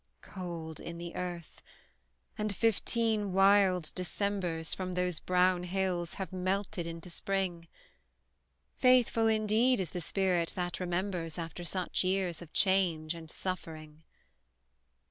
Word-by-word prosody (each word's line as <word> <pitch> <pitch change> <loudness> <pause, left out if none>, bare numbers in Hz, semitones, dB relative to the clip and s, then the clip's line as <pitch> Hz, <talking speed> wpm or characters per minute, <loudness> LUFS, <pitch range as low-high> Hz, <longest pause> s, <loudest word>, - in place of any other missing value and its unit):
Cold 170 -4 -6
in 170 - -7
the 170 0 -7
earth 175 -2 -5 0.7
and 210 -2 -2
fifteen 225 -1 +1
wild 195 -3 +4
Decembers, 180 -3 -1
From 185 -1 -3
those 180 -2 0
brown 180 0 +3
hills, 180 -2 -1
have 190 -1 -5
melted 185 -1 -1
into 165 +1 -7
spring: 180 -2 -2 1.1
Faithful, 250 -3 +5
indeed, 220 +3 +3
is 180 -4 -2
the 180 - -4
spirit 180 -1 0
that 175 -1 -2
remembers 175 -2 -2
After 170 +1 -5
such 180 +2 0
years 185 -2 0
of 165 -2 -11
change 175 -5 +2
and 165 -2 -10
suffering! 160 -4 -5
180 Hz, 120 wpm, -32 LUFS, 170-195 Hz, 1.1 s, Faithful